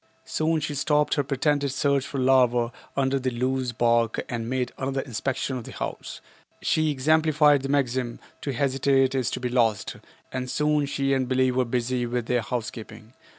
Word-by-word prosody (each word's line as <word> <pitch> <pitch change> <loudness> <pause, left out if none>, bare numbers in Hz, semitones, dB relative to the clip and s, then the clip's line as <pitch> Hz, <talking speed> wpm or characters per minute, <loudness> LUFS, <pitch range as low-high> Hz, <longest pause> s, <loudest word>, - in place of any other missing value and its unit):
Soon 160 +1 0
she 150 -1 -3
stopped 150 +1 +1
her 145 - +1
pretended 140 +1 0
search 140 0 +1
for 140 - -5
larvae 125 -2 +3 0.3
under 135 0 +1
the 130 0 -1
loose 130 +1 -1
bark 115 -1 +2
and 115 -1 -4
made 125 -1 -1
another 135 0 -1
inspection 130 +1 -3
of 125 - -6
the - - -9
house. - - -6 0.4
She 155 0 +1
exemplified 150 0 +3
the 135 - -4
maxim, 130 -3 0 0.2
"To 140 - -2
hesitate 135 +1 +2
is 130 -3 0
to - - -4
be 125 - -2
lost," 115 -4 +1 0.3
and 130 -1 -4
soon 150 0 +1
she 135 -1 0
and 130 -1 0
Billie 130 0 +3
were 125 0 +1
busy 120 +1 -1
with 120 -1 -2
their 120 0 +1
housekeeping. 115 -1 -6
130 Hz, 175 wpm, -25 LUFS, 120-140 Hz, 0.4 s, larvae